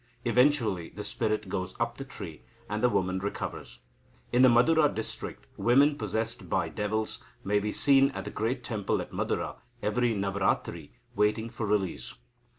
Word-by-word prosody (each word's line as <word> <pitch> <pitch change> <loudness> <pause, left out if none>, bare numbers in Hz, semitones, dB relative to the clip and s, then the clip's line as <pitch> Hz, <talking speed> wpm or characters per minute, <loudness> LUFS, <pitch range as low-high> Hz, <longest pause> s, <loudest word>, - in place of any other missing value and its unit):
Eventually 120 - +3
the - - -7
spirit 110 -1 -1
goes 95 -1 -3
up 115 +1 -1
the - - -3
tree, 90 - -9 0.3
and 105 +1 -2
the 125 - +4
woman 95 -3 0
recovers. 95 -10 -5 0.5
In 125 - +4
the 130 - +8
Madura 150 +6 +5
district, 110 - -5
women 140 +5 +4
possessed 110 - -3
by - - +1
devils 110 +1 -2 0.2
may 105 +1 +2
be 105 +1 -2
seen 135 +1 +5
at 135 - -6
the - - -5
great 120 +3 -2
temple 110 -4 -1
at - - -6
Madura - - -2 0.3
every 120 +2 +1
Navaratri, 95 -5 -1 0.3
waiting 110 +2 +1
for 115 -3 -3
release. 100 -4 -1
110 Hz, 155 wpm, -29 LUFS, 100-125 Hz, 0.5 s, the